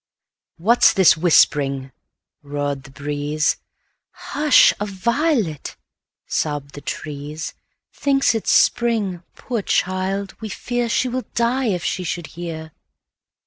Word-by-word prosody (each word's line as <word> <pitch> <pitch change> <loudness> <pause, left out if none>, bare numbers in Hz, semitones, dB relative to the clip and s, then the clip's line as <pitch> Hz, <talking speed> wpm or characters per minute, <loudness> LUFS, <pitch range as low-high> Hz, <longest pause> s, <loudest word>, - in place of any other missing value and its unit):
"What 225 +8 +2
's - - +8
this 190 -3 +6
whispering?" 140 -5 +3 0.5
roared 145 -1 -3
the - - -12
breeze;"Hush! 150 - 0
a 210 - -1
violet," 215 - -1 0.5
sobbed 145 -2 -2
the 145 - -9
trees,"Thinks 155 - -3
it 225 - -3
's - - +4
spring,—poor 225 -1 +1
child, 190 +1 -1
we 220 - -5
fearShe 245 +3 -1
will 255 +1 -3
die 245 +3 +1
if 180 -6 -1
she 185 - -2
should 175 -1 -3
hear!" 160 -2 -6
180 Hz, 105 wpm, -21 LUFS, 150-235 Hz, 0.5 s, s